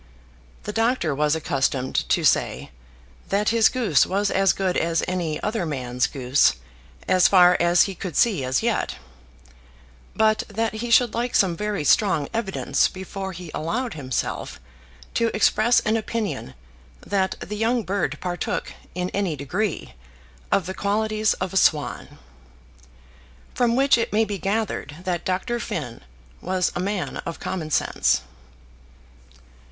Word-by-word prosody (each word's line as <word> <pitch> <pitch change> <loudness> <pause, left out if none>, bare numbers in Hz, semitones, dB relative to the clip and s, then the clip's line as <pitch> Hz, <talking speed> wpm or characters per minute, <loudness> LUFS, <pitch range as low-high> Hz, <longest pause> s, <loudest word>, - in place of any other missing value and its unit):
The 210 - -5
doctor 225 - +1
was 150 +2 +1
accustomed 135 -4 -1
to - - +2
say - - +1 0.6
that 205 +2 +1
his 225 -1 +4
goose 230 - +2
was 200 +2 0
as 195 0 +3
good 185 -2 -1
as 165 0 +1
any 175 -4 -2
other 210 -2 -1
man's 125 -5 -1
goose, 130 - +2 0.5
as 185 -1 +5
far 180 -2 +6
as 175 +1 +5
he 195 - -3
could 180 -3 -6
see 205 - +2
as 130 0 0
yet; - - 0 1.2
but 215 0 +3
that 220 +2 -1
he 230 +2 -4
should 235 -1 +4
like 240 +1 -2
some 185 -4 +3
very 210 -2 -2
strong 160 -2 +3
evidence 225 -4 +1
before 190 +1 -6
he 175 -2 -9
allowed 225 +9 -2
himself 130 -6 -4 0.5
to 230 - +2
express 215 +2 +3
an 220 -1 0
opinion 220 - -3 0.5
that 190 -2 -1
the 210 - -6
young 230 +2 +1
bird 200 +1 -2
partook, 175 -2 -3 0.2
in 180 0 -2
any 195 -6 -1
degree, 160 - -3 0.6
of 195 - +2
the 190 - -4
qualities 215 +2 0
of 185 0 -4
a - - +1
swan. 150 -5 +1 1.4
From 235 -1 +2
which 270 -1 +4
it 230 - -1
may 220 +1 +3
be 200 -2 -4
gathered 200 -5 -2
that 180 -2 -2
Dr. 215 +6 -1
Finn 140 - -5 0.4
was 185 0 0
a - - -2
man 195 0 -2
of 165 - -6
common 170 -5 -4
sense. 70 - +1
190 Hz, 145 wpm, -23 LUFS, 165-215 Hz, 1.4 s, far